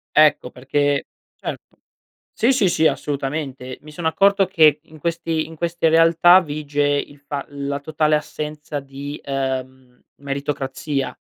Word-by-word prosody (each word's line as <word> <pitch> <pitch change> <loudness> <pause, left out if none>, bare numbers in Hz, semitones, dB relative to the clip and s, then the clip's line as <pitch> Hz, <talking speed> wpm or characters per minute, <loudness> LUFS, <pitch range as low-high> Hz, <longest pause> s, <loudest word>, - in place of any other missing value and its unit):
Ecco, 150 -4 +5
perché 145 +2 0 0.3
certo. - - -8 0.6
Sì, 240 +4 +3
sì, 205 -8 +3
sì, 160 -2 +2
assolutamente. 135 -2 -3
Mi 150 +1 -13
sono 160 +1 -3
accorto 195 +3 +4
che, 155 -3 +4
in 155 -1 -16
questi 165 -1 -1
in 165 - -11
queste 170 0 0
realtà 165 +2 +6
vige 145 -2 -2
il 145 0 -1
fa 140 -1 -5
la 140 0 -4
totale 155 +1 +1
assenza 150 -1 -4
di, 140 +1 -8
ehm, 130 -2 -4 0.2
meritocrazia. 140 0 -3
145 Hz, 135 wpm, -21 LUFS, 140-160 Hz, 0.6 s, realtà